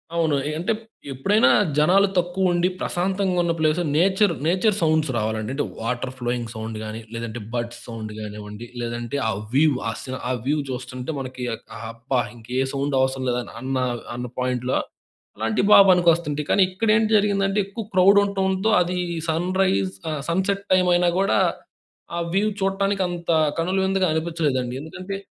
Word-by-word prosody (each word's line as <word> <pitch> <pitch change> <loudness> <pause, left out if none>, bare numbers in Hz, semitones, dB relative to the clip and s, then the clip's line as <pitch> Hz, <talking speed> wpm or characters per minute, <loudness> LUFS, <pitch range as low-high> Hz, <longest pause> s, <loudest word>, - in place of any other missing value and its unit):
అవును. 160 -3 +2
ఏ - - -2
అంటే 185 +6 0 0.4
ఎప్పుడైనా 200 - +3 0.3
జనాలు 190 +6 +5
తక్కువ 180 +1 +1
ఉండి, 175 +1 +2
ప్రశాంతంగా 185 +1 0
ఉన్న 170 -1 +1
ప్లేస్‌లో 155 +3 +2
నేచర్ 190 +1 +3
నేచర్ 190 +4 +2
సౌండ్స్ 155 -3 +2
రావాలండి. 110 +1 -2
అంటే 145 +1 -1 0.2
వాటర్ 125 +3 -2
ఫ్లోయింగ్ 120 -1 -2
సౌండ్ 110 0 -5
గాని, 110 +1 -6
లేదంటే 115 0 -5
బర్డ్స్ 120 -1 -3
సౌండ్ 110 -2 -6
కానివ్వండి, 105 +1 -8
లేదంటే 120 +2 -3
ఆహ్, 105 -2 -2
వ్యూ 150 +3 +5 0.2
ఆహ్, 125 +1 -4
వ్యూ 150 +1 +2
చూస్తుంటే 130 +3 -5
మనకి 130 -1 -5 0.5
అబ్బా! 125 +2 -1
ఇంకే 115 +1 -10
ఏ - - -1
సౌండ్ 140 0 -1
అవసరం 130 0 0
లేదన్న 125 +2 -3 0.4
అన్న 125 +1 -4
పాయింట్‌లో 125 0 0 0.6
అలాంటివి 110 - 0
బాగా 200 - +9
పనికొస్తుంటాయి. 170 -4 +2
కానీ 200 - +4
ఇక్కడ 200 +4 -2
ఏంటి 220 0 +1
జరిగిందంటే 200 -1 +1
ఎక్కువ 200 +3 -6
క్రౌడ్ 190 +2 +6
ఉంటంతో, 190 +1 0
అది 180 +1 -1 0.3
సన్‌రైజ్ 165 - +1 0.2
ఆహ్, 150 -2 -3
సన్‌సెట్ 195 +3 0
టైమ్ 185 -1 +4
అయినా 175 0 +3
కూడా 195 +1 +2 0.8
ఆహ్, 170 0 -1
వ్యూ 210 +2 +3
చూడటానికి 195 0 0
అంత 170 -1 -3 0.3
కనుల 180 +4 0
విందుగా 190 0 +2
అనిపించలేదండి. 155 -6 -1
ఎందుకంటే 185 +5 -6
155 Hz, 150 wpm, -23 LUFS, 125-190 Hz, 0.8 s, బాగా